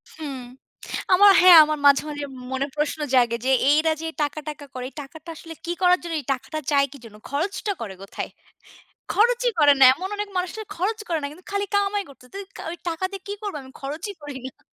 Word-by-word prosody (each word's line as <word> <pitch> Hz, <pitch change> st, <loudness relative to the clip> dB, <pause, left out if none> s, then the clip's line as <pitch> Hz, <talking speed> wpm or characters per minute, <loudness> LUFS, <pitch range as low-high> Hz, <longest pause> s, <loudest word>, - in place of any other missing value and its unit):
হুম। 290 Hz, -4 st, -6 dB, 0.8 s
আমার 405 Hz, +2 st, +8 dB
হ্যাঁ, 360 Hz, -1 st, +9 dB
আমার 305 Hz, 0 st, -2 dB
মাঝে, 280 Hz, -1 st, +6 dB
মাঝে 290 Hz, -1 st, -4 dB, 0.3 s
মনে 265 Hz, +1 st, 0 dB
প্রশ্ন 300 Hz, +1 st, -1 dB
জাগে 240 Hz, -2 st, +4 dB
যে, 260 Hz, -, +1 dB, 0.2 s
এইরা 310 Hz, +2 st, +4 dB
যে -, -, -3 dB, 0.2 s
টাকা, 290 Hz, +1 st, -2 dB
টাকা 300 Hz, -1 st, -7 dB
করে, 255 Hz, -1 st, -6 dB
এই -, -, -33 dB
টাকাটা 315 Hz, +4 st, -11 dB
আসলে 325 Hz, +1 st, -10 dB
কী 340 Hz, -, -2 dB
করার 360 Hz, 0 st, +5 dB
জন্য? 340 Hz, -1 st, -5 dB
এই 275 Hz, -, -15 dB
টাকাটা 270 Hz, +4 st, -4 dB
চায় 280 Hz, -1 st, +4 dB
কী 285 Hz, -, -10 dB
জন্য? 215 Hz, -2 st, -12 dB
খরচটা 365 Hz, +8 st, -2 dB
করে 210 Hz, -4 st, -5 dB
কোথায়? 195 Hz, -, -6 dB, 0.8 s
খরচই 485 Hz, +3 st, +3 dB
করে 290 Hz, -1 st, +7 dB
না। -, -, +8 dB
এমন 365 Hz, +7 st, -5 dB
অনেক 415 Hz, 0 st, -2 dB
মানুষ 365 Hz, 0 st, -1 dB
যারা 435 Hz, -2 st, -7 dB
খরচ 415 Hz, +6 st, -1 dB
করে 330 Hz, -2 st, 0 dB
না 285 Hz, -, -2 dB
কিন্তু, 355 Hz, +5 st, -15 dB
খালি 400 Hz, 0 st, 0 dB
কামাই 405 Hz, 0 st, +1 dB
করতেছে। 250 Hz, -2 st, -17 dB
তুই 400 Hz, -, -5 dB, 0.3 s
ওইক 340 Hz, 0 st, -8 dB
টাকা 330 Hz, +2 st, -5 dB
দিয়ে 395 Hz, -1 st, -7 dB
কী 405 Hz, -, -3 dB
করব 410 Hz, -5 st, -4 dB
আমি? 260 Hz, 0 st, -14 dB
খরচই 305 Hz, +9 st, -5 dB
করি 290 Hz, -2 st, -6 dB
না। 260 Hz, -, -15 dB
315 Hz, 215 wpm, -23 LUFS, 280-375 Hz, 0.8 s, হ্যাঁ